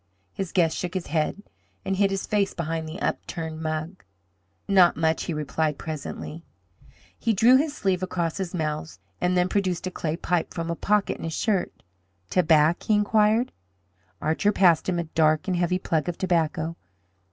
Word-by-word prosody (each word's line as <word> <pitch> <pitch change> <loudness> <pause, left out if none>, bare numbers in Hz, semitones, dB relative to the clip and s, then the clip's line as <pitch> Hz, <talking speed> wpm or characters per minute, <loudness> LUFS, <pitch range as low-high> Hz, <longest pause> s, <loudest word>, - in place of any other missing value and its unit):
His 195 -3 -4
guest 165 -3 +2
shook 180 +1 -4
his 185 - -2
head 160 +6 -1 0.4
and 195 0 0
hid 195 +1 +3
his 195 -1 -2
face 205 -2 0
behind 165 -1 -3
the 160 - -7
upturned 160 -1 -3
mug. 155 +3 -4 0.6
"Not 190 -3 +5
much," 160 0 +1
he 170 - -2
replied, 150 +1 -1
presently. 155 +1 -6 0.8
He 230 - +1
drew 230 +6 +6
his 295 +1 -1
sleeve 190 -2 0
across 175 -3 -2
his 190 -3 -3
mouth, 155 -2 -3 0.2
and 180 0 +2
then 180 0 +3
produced 185 -3 -1
a 185 - -3
clay 160 -2 -3
pipe 175 -1 -1
from 170 0 -2
a - - -2
pocket 205 +3 +1
in - - -8
his 165 -1 -3
shirt. 205 -5 -1 0.5
"Tobac?" 160 -2 +4
he 215 - +2
inquired. 215 +3 +3 0.7
Archer 160 +7 +1
passed 175 -4 +4
him 180 - 0
a 170 - 0
dark 155 0 +1
and 185 - +1
heavy 175 +1 +1
plug 165 -3 -1
of 175 - -4
tobacco. 165 -2 0
175 Hz, 175 wpm, -25 LUFS, 160-195 Hz, 0.8 s, drew